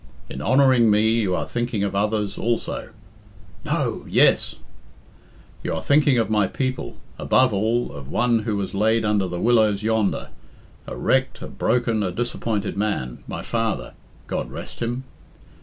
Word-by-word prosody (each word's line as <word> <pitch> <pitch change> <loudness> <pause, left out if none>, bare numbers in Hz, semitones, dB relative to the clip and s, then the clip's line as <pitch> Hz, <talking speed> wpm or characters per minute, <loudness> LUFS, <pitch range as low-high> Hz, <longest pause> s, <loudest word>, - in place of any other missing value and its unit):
In 65 - -6
honouring 130 - +4
me 105 +1 +4
you 95 -4 0
are - - -2
thinking 120 -4 -2
of 100 -1 -2
others 105 0 0
also 115 0 -2 0.7
['No,' - - -1
'Yes'); - - +4 1.1
you - - -2
are 80 - -3
thinking 145 -2 +4
of 115 -3 +2
my 105 -2 +2
people 130 +4 -3 0.2
above 130 -3 +3
all, 110 +4 0
of 70 -2 -9
one 120 +4 +2
who 105 -1 -2
was 95 -2 -3
laid 110 +2 +2
under 105 -3 +1
the 90 0 -4
willows 110 -3 +3
yonder, 110 -2 0 0.6
a - - -5
wrecked, - - 0
a - - -5
broken, 115 -3 0
a 95 -3 -1
disappointed 110 0 -2
man 100 - -2
my - - -5
father, 115 -1 -2 0.3
God - - -3
rest - - -8
him! 120 +2 -2
110 Hz, 155 wpm, -23 LUFS, 100-120 Hz, 1.1 s, honouring